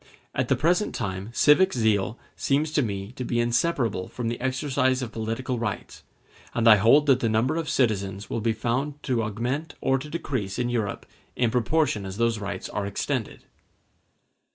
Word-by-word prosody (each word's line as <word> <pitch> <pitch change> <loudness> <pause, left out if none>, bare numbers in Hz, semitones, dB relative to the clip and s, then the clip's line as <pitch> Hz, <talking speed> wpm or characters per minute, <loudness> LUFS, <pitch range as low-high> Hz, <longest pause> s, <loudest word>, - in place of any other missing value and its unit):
At - - 0
the - - +3
present 175 +6 +1
time 95 -2 -4
civic 150 +10 +5
zeal 110 -2 +1 0.2
seems 150 +3 0
to 155 - +2
me 100 -3 -3
to 125 - -6
be 120 -1 -1
inseparable 120 - 0
from 120 -2 -4
the 120 - -4
exercise 130 0 0
of 115 - -5
political 115 +3 -3
rights; 110 -4 -4 0.5
and 115 -1 +2
I 110 -2 +9
hold 120 +9 +5
that 135 -3 +4
the 115 - +1
number 115 +7 +1
of 165 -2 -2
citizens 100 -5 0
will 115 - -3
be 115 +1 +1
found 120 +6 -1
to 125 -3 0
augment 120 +9 -3
or 135 0 +1
to 150 +3 -8
decrease 130 - -3
in 120 -1 0
Europe 115 -4 -2 0.3
in 120 -2 +1
proportion 125 -2 +1
as 95 +1 -7
those 115 -1 +1
rights 95 -3 -5
are 100 -1 -3
extended. 100 - -3
120 Hz, 175 wpm, -25 LUFS, 110-135 Hz, 0.5 s, I